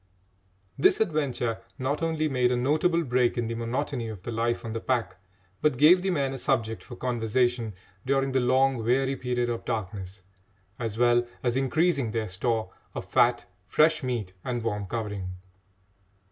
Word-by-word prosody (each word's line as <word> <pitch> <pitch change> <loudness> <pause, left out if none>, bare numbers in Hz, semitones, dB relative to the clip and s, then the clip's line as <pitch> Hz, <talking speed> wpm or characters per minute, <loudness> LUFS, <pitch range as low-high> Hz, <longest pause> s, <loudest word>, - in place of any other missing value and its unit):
This - - +5
adventure 140 - 0 0.2
not 135 +4 -1
only 160 -1 0
made 125 -3 +2
a - - +2
notable 155 +7 +2
break 125 -3 +1
in 120 - 0
the 115 - -3
monotony 120 +2 -2
of 105 -5 -8
the 120 - -4
life 120 +1 -1
on 110 - -4
the 115 - -2
pack, 120 -1 -1 0.4
but 150 -5 +2
gave 170 +7 +7
the 190 - -1
men 140 -6 0
a 135 - -5
subject 115 -2 0
for 120 - -10
conversation 120 -2 0 0.3
during 135 0 +1
the 130 - +2
long 130 +1 +3
weary 130 +4 +1
period 125 -1 -1
of 115 - -4
darkness, 95 -2 -5 0.6
as 115 -3 -3
well 120 0 +3 0.2
as 120 -1 +1
increasing 140 0 +2
their 110 -1 -2
store 110 +4 -1 0.2
of - - -4
fat, - - +3 0.2
fresh 155 0 +3
meat, 120 -8 -3
and 120 -2 -2
warm 105 -3 -2
covering. 100 -4 -4
125 Hz, 165 wpm, -27 LUFS, 115-135 Hz, 0.6 s, gave